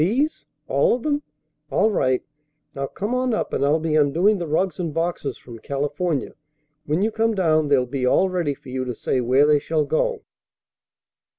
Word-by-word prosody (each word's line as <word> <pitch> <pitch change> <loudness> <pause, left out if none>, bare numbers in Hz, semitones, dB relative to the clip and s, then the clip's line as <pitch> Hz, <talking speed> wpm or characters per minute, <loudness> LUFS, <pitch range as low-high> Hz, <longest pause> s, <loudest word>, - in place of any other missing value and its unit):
These? 260 - 0 0.2
All - - +3
of 245 - -7
them? 290 -1 0 0.5
All 220 - +2
right. 130 -9 +1 0.5
Now 140 0 -3
come 205 - -4
on 250 -2 +1
up, - - -3
and - - 0
I'll 145 +3 +3
be 160 -1 -1
undoing 165 +8 +3
the 170 - -3
rugs 175 +4 0
and 170 -3 -2
boxes 165 -1 -2
from 115 -2 -12
California. 145 +4 -2 0.5
When 155 +6 +1
you 220 - +1
come 225 0 +1
down, 155 -5 +2
they'll 135 -3 +3
be 125 0 -2
all 190 - +4
ready 175 -6 -1
for 130 - -14
you 130 0 -2
to 125 -2 -4
say 130 - -1
where 130 +4 +4
they 150 -1 +4
shall 155 +1 0
go." 475 - 0
155 Hz, 190 wpm, -23 LUFS, 140-205 Hz, 0.5 s, all